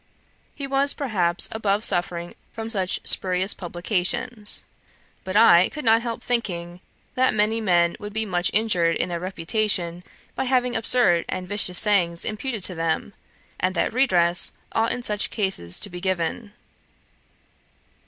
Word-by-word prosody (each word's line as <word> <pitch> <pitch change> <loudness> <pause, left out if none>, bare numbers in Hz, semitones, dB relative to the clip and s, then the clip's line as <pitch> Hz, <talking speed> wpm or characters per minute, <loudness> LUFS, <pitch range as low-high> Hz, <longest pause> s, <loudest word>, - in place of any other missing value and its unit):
He 280 - -6
was, 275 +1 +1
perhaps, 185 -11 0
above 210 -1 -1
suffering 175 -3 0 0.2
from 225 0 -6
such 190 -4 -1
spurious 185 +1 +2
publications; 205 +5 -2 0.6
but 190 +2 -2
I 185 -5 +6
could 300 -4 -8
not 225 0 +4
help 235 -1 -5
thinking, 175 -8 -3 0.3
that 255 -3 +1
many 215 +2 +1
men 175 -4 +2
would 210 0 -7
be 220 +1 -2
much 175 -3 0
injured 180 -6 +1
in - - -2
their 170 -1 -3
reputation, 180 -1 -2 0.3
by - - -3
having 250 -1 0
absurd 225 -6 +3
and 180 0 -4
vicious 190 -2 +2
sayings 180 -5 +3
imputed 215 -1 -4
to 185 - +5
them; 165 +4 -2 0.5
and 185 +1 -1
that 170 - -1
redress 180 -9 +2 0.2
ought 225 +1 0
in 245 - -4
such 210 -2 0
cases 190 - -1
to 205 - +1
be 175 0 -8
given. 190 +3 -3
200 Hz, 145 wpm, -23 LUFS, 175-225 Hz, 0.6 s, I